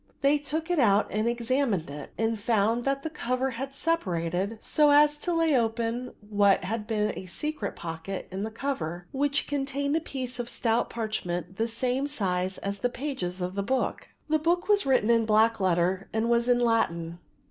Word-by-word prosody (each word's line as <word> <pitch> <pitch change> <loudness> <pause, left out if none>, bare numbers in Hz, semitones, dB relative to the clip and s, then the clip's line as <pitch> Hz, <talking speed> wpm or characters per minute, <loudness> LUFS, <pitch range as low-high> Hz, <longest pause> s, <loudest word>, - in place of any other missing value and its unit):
They 285 +2 +4
took 310 +4 -3
it 350 - +2
out 210 -4 +4
and 215 +3 +1
examined 235 - 0
it 145 0 -7
and 225 -1 0
found 225 +2 +1
that 275 0 0
the 320 - -2
cover 260 -3 -1
had 270 +3 -5
separated 190 - -1
so 300 +5 +3
as 295 +1 +6
to 350 - -2
lay 330 -3 +3
open 235 +1 -1
what 205 -2 +3
had 210 +3 -3
been 210 -2 0
a 185 - -7
secret 300 - -4
pocket 165 +3 -6
in 190 +1 -4
the 215 - -2
cover, 180 - -4
which 280 +1 +1
contained 280 0 -1
a - - +3
piece 255 -5 -5
of 240 0 -3
stout 230 -1 0
parchment 190 -6 -3
the 225 +1 +1
same 250 +4 0
size 185 -8 -1
as 200 0 -4
the 245 - +1
pages 240 -10 -4
of 180 +1 -2
the 200 - -1
book. 260 +6 -1 0.2
The 310 0 +2
book 345 +4 +1
was 410 -6 +3
written 250 -4 +3
in 230 -1 +3
black 220 +1 +4
letter 185 0 +1
and 225 +2 0
was 235 +1 +2
in 245 - +5
Latin. 175 -8 0
230 Hz, 190 wpm, -27 LUFS, 195-275 Hz, 0.2 s, as